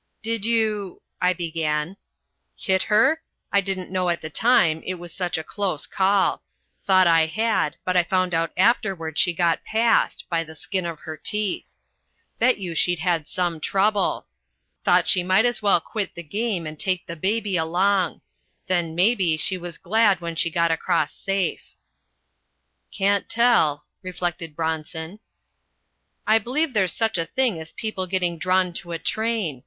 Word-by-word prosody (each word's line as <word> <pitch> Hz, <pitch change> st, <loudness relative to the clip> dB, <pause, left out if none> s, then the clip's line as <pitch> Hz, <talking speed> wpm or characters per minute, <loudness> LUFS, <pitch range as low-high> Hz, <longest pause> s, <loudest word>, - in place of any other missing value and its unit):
"Did 225 Hz, -1 st, -2 dB
you 215 Hz, -5 st, 0 dB
" -, -, -39 dB
I 180 Hz, -, +4 dB
began. 165 Hz, -1 st, -2 dB, 0.6 s
"Hit 190 Hz, -2 st, +1 dB
her? 225 Hz, +10 st, +3 dB, 0.3 s
I 200 Hz, -, +5 dB
didn't 185 Hz, -2 st, -4 dB
know 185 Hz, -1 st, 0 dB
at 170 Hz, -, 0 dB
the 155 Hz, -, -8 dB
time, 165 Hz, -7 st, +3 dB
it 185 Hz, -, -3 dB
was 175 Hz, -1 st, -9 dB
such 180 Hz, -3 st, -2 dB
a 160 Hz, -, -4 dB
close 185 Hz, -3 st, -3 dB
call. 195 Hz, +1 st, +1 dB, 0.4 s
Thought 185 Hz, -1 st, +5 dB
I 165 Hz, -2 st, +4 dB
had, 215 Hz, -2 st, 0 dB
but 185 Hz, -, 0 dB
I 180 Hz, -, +6 dB
found 185 Hz, 0 st, 0 dB
out 165 Hz, 0 st, 0 dB
afterward 185 Hz, -7 st, +1 dB
she 175 Hz, -, +4 dB
got 170 Hz, -1 st, +1 dB
past 225 Hz, +1 st, +1 dB
by 165 Hz, -2 st, 0 dB
the 160 Hz, 0 st, -12 dB
skin 185 Hz, +3 st, -3 dB
of 165 Hz, -2 st, -7 dB
her 155 Hz, -, -6 dB
teeth. 210 Hz, +2 st, -2 dB, 0.6 s
Bet 250 Hz, +2 st, +4 dB
you 180 Hz, -4 st, -5 dB
she'd 175 Hz, +2 st, +1 dB
had 165 Hz, -2 st, -1 dB
some 175 Hz, -3 st, -2 dB
trouble. 200 Hz, +4 st, +1 dB, 0.6 s
Thought -, -, +3 dB
she 180 Hz, -, +3 dB
might 185 Hz, +5 st, +3 dB
as 240 Hz, -2 st, 0 dB
well 200 Hz, -4 st, +4 dB
quit 205 Hz, +4 st, -4 dB
the 170 Hz, -, -7 dB
game 200 Hz, +1 st, -2 dB
and 155 Hz, 0 st, -7 dB
take 185 Hz, -2 st, -1 dB
the 170 Hz, -, -6 dB
baby 200 Hz, +3 st, -1 dB
along. 180 Hz, +2 st, +1 dB, 0.4 s
Then, 175 Hz, -4 st, -1 dB
mebbe, 180 Hz, -4 st, +2 dB
she 185 Hz, +4 st, +1 dB
was 175 Hz, -2 st, -7 dB
glad 205 Hz, -1 st, +2 dB
when 170 Hz, -1 st, -5 dB
she 170 Hz, -, +1 dB
got 170 Hz, 0 st, +1 dB
across 160 Hz, -2 st, 0 dB
safe." 195 Hz, -2 st, -3 dB, 1.2 s
"Can't 200 Hz, 0 st, +1 dB
tell," 225 Hz, -12 st, +3 dB, 0.2 s
reflected 175 Hz, -4 st, -4 dB
Bronson. 160 Hz, +3 st, -4 dB, 1.1 s
"I 220 Hz, +1 st, +4 dB
b'lieve 265 Hz, +7 st, -1 dB
there's 190 Hz, -4 st, +2 dB
such 225 Hz, -5 st, 0 dB
a 165 Hz, -, -1 dB
thing 250 Hz, -10 st, 0 dB
as 160 Hz, -, -9 dB
people 215 Hz, -5 st, -4 dB
getting 175 Hz, -2 st, -1 dB
drawn 185 Hz, 0 st, +1 dB
to 175 Hz, -1 st, -8 dB
a -, -, -1 dB
train. 215 Hz, -, -2 dB
185 Hz, 165 wpm, -23 LUFS, 165-205 Hz, 1.2 s, I